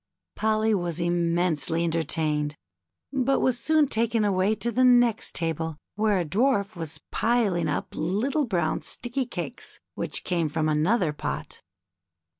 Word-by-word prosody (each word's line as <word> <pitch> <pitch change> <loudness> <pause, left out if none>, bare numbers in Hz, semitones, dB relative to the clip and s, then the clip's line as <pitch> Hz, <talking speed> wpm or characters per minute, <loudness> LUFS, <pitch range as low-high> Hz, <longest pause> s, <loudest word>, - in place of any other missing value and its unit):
Polly 220 0 +2
was 175 -4 -1
immensely 170 -1 +1
entertained, 155 -2 0 0.6
but 270 0 +2
was 250 -2 +1
soon 310 +4 +3
taken 230 -2 +1
away 195 +1 +2
to 235 +2 -2
the 255 +3 +2
next 245 -3 +4
table, 165 -2 -2 0.2
where 210 -1 +2
a 175 - 0
dwarf 200 - +1
was 160 -3 -5
piling 210 -8 +1
up 145 - -2
little 245 - 0
brown 170 -7 0
sticky 250 +1 -3
cakes 235 +2 -5 0.2
whicli - - -1
came 170 -4 0
from 155 +1 0
another 155 +3 +2
pot. 150 - -5
185 Hz, 135 wpm, -26 LUFS, 165-235 Hz, 0.6 s, next